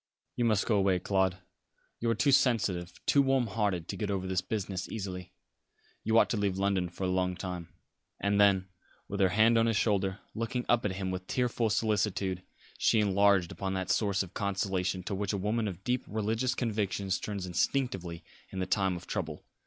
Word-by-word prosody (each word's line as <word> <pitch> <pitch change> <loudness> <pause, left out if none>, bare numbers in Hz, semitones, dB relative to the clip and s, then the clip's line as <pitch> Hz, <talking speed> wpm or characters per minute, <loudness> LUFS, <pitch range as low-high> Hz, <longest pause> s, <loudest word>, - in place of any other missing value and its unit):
"You 120 - +1
must 110 -3 +2
go 110 - +2
away, 95 -1 +3
Claude. 95 0 +1 0.6
You 115 - 0
are 115 - +2
too 140 +6 +3
sensitive, 110 -10 +2
too 140 - +5
warm 135 -2 +2
hearted 100 -6 -1
to - - -4
get 105 -2 -3
over 95 -2 -1
this 95 -1 0
business 100 -5 -3
easily. 95 -4 -5 0.7
You 110 +1 +2
ought - - +6
to 115 - 0
leave 100 -2 0
London 95 -2 +1
for 90 +2 -7
a - - +1
long 90 0 0
time." 90 -2 -6 0.5
And 100 0 +2
then, 95 -2 +4 0.4
with 100 - -4
her 95 -2 +4
hand 110 +4 +4
on 115 - +3
his 115 -2 +2
shoulder, 100 -3 +1 0.2
looking 115 +2 -2
up 120 -2 +2
at 100 - 0
him 95 0 -3
with 95 0 -5
tearful 120 -2 0
solicitude, 100 -4 0 0.4
she 110 - +4
enlarged 100 -3 +3
upon 95 -1 -3
that 95 -1 -1
source 100 -2 +1
of 95 0 -11
consolation 95 -2 -1
to 100 - -4
which 100 +1 -2
a - - 0
woman 105 +3 0
of 95 -1 -6
deep 125 +1 0
religious 110 +4 -1
convictions 105 -5 -1
turns 100 -3 -4
instinctively 90 -3 -1 0.3
in 95 - -8
the 95 - 0
time 95 0 +1
of 85 - -8
trouble. 80 -7 -4
100 Hz, 195 wpm, -30 LUFS, 95-110 Hz, 0.7 s, ought